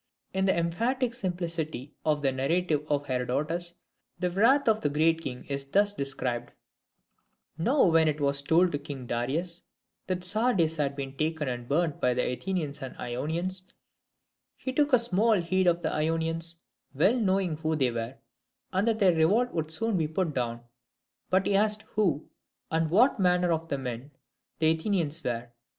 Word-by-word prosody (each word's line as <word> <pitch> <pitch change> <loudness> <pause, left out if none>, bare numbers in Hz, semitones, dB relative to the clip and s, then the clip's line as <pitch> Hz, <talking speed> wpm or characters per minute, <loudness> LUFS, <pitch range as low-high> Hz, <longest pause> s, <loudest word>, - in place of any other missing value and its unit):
In 190 0 +1
the 190 - +2
emphatic 230 +9 0
simplicity 170 - -4
of 150 -2 +1
the 135 - +3
narrative 150 +3 0
of 145 -1 0
Herodotus, 150 +7 -2 0.4
the 180 0 -1
wrath 235 +10 +4
of 220 -1 +3
the 145 - +1
Great 160 +3 +2
King 125 -5 -6
is 140 -1 -3
thus 200 +9 +2
described: 130 -6 -3 1.0
"Now 240 - +3
when 165 -2 +4
it 155 0 0
was 140 -1 +2
told 170 +5 +3
to 145 - -2
King 140 -3 -7
Darius 150 +10 -2 0.5
that 185 -1 -1
Sardis 185 -5 +1
had 140 -2 0
been 135 -1 -6
taken 155 -1 -1
and 120 -1 -4
burnt 155 +1 0
by 125 -1 +2
the 125 - 0
Athenians 155 -1 -3
and 130 -1 -7
Ionians, 170 +10 -3 0.9
he 260 - -4
took 295 +1 +2
small 225 0 +2
heed 185 -1 +1
of 175 0 +2
the - - -1
Ionians, 165 +1 0 0.3
well 195 - +3
knowing 190 -6 +1
who 160 0 -1
they 130 -5 +1
were, 115 +2 -4 0.6
and 190 +4 +1
that 225 -1 +2
their 195 -5 +4
revolt 205 +10 +2
would 160 -2 -2
soon 215 +5 0
be 160 -3 +1
put 160 0 -1
down: 120 -2 -2 0.7
but 185 +1 +2
he 200 - +2
asked 215 +1 +2
who, 170 -9 +1 0.4
and 160 0 +1
what 225 - +4
manner 180 -1 +3
of 165 0 -1
men, 125 +1 -5 0.5
the 160 0 +3
Athenians 165 -2 0
were. 120 -1 -3
165 Hz, 165 wpm, -28 LUFS, 140-185 Hz, 1.0 s, wrath